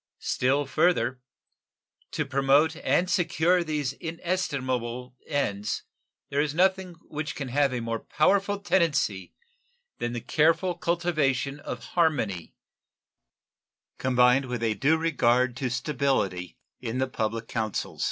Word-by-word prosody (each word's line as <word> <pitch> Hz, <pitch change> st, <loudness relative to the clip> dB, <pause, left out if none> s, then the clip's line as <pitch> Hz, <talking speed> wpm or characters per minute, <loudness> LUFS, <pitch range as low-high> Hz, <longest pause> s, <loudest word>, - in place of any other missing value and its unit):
Still 135 Hz, +3 st, +1 dB
further 135 Hz, -5 st, +1 dB, 0.9 s
to 155 Hz, -, -2 dB
promote 140 Hz, +3 st, +3 dB
and 175 Hz, +2 st, +1 dB
secure 180 Hz, -1 st, +2 dB
these 150 Hz, -4 st, -2 dB
inestimable 130 Hz, -8 st, -3 dB
ends 105 Hz, -9 st, -1 dB, 0.5 s
there 140 Hz, +1 st, +1 dB
is 150 Hz, 0 st, -2 dB
nothing 185 Hz, 0 st, +2 dB
which 150 Hz, -1 st, -4 dB
can 140 Hz, -3 st, -5 dB
have 140 Hz, +1 st, +2 dB
a 125 Hz, -2 st, -2 dB
more 115 Hz, 0 st, -2 dB
powerful 200 Hz, -, +1 dB
tendency 145 Hz, -, 0 dB, 0.6 s
than 120 Hz, 0 st, -2 dB
the 120 Hz, -, -2 dB
careful 165 Hz, -, +2 dB
cultivation 160 Hz, -6 st, 0 dB
of -, -, -6 dB
harmony, 130 Hz, -, 0 dB, 1.4 s
combined 125 Hz, +1 st, +4 dB
with 125 Hz, -2 st, -4 dB
a 110 Hz, -1 st, +2 dB
due 140 Hz, +10 st, +2 dB
regard 125 Hz, -6 st, +2 dB
to 130 Hz, 0 st, -1 dB
stability, 125 Hz, -, -1 dB, 0.2 s
in 115 Hz, +2 st, -4 dB
the 130 Hz, -, +2 dB
public 115 Hz, -2 st, -3 dB
councils. 110 Hz, -3 st, -3 dB
140 Hz, 120 wpm, -27 LUFS, 125-165 Hz, 1.4 s, combined